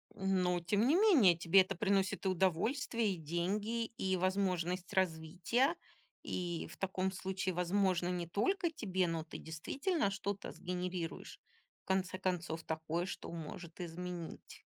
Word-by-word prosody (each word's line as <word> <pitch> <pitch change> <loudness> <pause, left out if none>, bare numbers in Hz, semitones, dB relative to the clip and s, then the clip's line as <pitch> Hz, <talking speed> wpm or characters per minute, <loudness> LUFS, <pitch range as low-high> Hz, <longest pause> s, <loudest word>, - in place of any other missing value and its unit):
Ну, 185 -2 +1
тем 205 +7 +2
не 295 - +5
менее, 330 - +6
тебе 170 +3 +6
это 190 +1 -2
приносит 195 +1 +1
и - - +4
удовольствие, 210 - +1
и - - -6
деньги, 195 +8 -1
и 190 -5 -1
возможность 185 -1 0
развития. 190 - +1 0.5
И 175 -2 -3
в - - -12
таком 190 0 -1
случае, 190 0 -2
возможно, 180 0 +2
не 175 -1 -2
только 345 - +1
тебе, 190 - 0
но 165 -1 -1
ты 160 - -8
действительно 200 - -1
что-то 200 0 -3
сгенерируешь. 180 -2 -4 0.4
В - - -
конце 190 -1 0
концов, 175 -3 -2
такое, 160 +2 -2
что 185 - -6
может 165 +1 -7
изменить. 175 0 -6
185 Hz, 140 wpm, -35 LUFS, 170-200 Hz, 0.5 s, менее